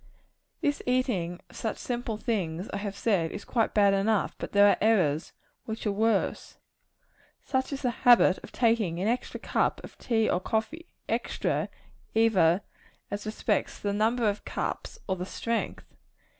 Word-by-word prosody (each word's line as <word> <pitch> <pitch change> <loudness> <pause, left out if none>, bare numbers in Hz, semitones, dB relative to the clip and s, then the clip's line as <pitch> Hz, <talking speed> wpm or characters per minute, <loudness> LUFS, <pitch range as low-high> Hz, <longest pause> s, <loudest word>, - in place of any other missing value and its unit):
This 290 0 0
eating 205 -9 0
of - - -17
such 220 - -3
simple 240 -3 -3
things, 190 -5 -2
I - - -1
have 200 -1 -4
said, 185 -8 +1
is 205 - -7
quite 225 -3 0
bad 200 -2 +5
enough; 200 +1 +1
but - - -5
there 205 0 +6
are - - +4
errors 175 -9 +2 0.3
which 220 +1 -5
are 210 - +2
worse. 215 0 0 0.9
Such 260 0 -1
is 275 0 -4
the 250 - +2
habit 240 -6 +6
of - - -12
taking 225 -8 +1
an 195 - 0
extra 245 +2 -1
cup - - 0
of - - -11
tea 225 -2 +1
or 175 - +2
coffee 225 - -2 0.2
extra, - - -1 0.5
either 195 -6 +4 0.5
as 205 +1 -4
respects 215 -1 -1
the 200 -1 -1
number 225 +3 +2
of 205 0 -1
cups - - -4
or 190 -1 -1
the 180 - -4
strength. 230 +2 -3
215 Hz, 160 wpm, -28 LUFS, 195-230 Hz, 0.9 s, there